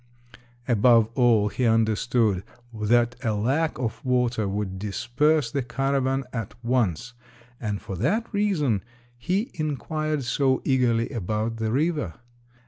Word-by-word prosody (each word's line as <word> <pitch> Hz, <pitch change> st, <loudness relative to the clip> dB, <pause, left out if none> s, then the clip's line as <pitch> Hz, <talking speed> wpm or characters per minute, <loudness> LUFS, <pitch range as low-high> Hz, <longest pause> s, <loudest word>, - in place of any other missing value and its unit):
Above 115 Hz, -1 st, +4 dB
all 115 Hz, -5 st, +3 dB
he 125 Hz, -, -3 dB
understood 110 Hz, -3 st, +2 dB, 0.3 s
that 120 Hz, +3 st, +2 dB
a 110 Hz, -3 st, 0 dB
lack 135 Hz, +10 st, 0 dB
of 115 Hz, -2 st, -4 dB
water 125 Hz, -4 st, +1 dB
would 95 Hz, -1 st, -3 dB
disperse 120 Hz, +7 st, +1 dB
the 140 Hz, -, -1 dB
caravan 135 Hz, +1 st, 0 dB
at 115 Hz, -5 st, -4 dB
once, 120 Hz, -3 st, 0 dB, 0.5 s
and 105 Hz, -3 st, -3 dB
for 95 Hz, -, -5 dB
that 205 Hz, -, 0 dB
reason 165 Hz, -, +1 dB, 0.3 s
he 185 Hz, -, -1 dB
inquired 155 Hz, 0 st, -2 dB
so 130 Hz, +1 st, +1 dB
eagerly 120 Hz, -4 st, +2 dB
about 110 Hz, 0 st, -2 dB
the 110 Hz, -1 st, -1 dB
river. 150 Hz, -, 0 dB
120 Hz, 125 wpm, -25 LUFS, 110-135 Hz, 0.5 s, Above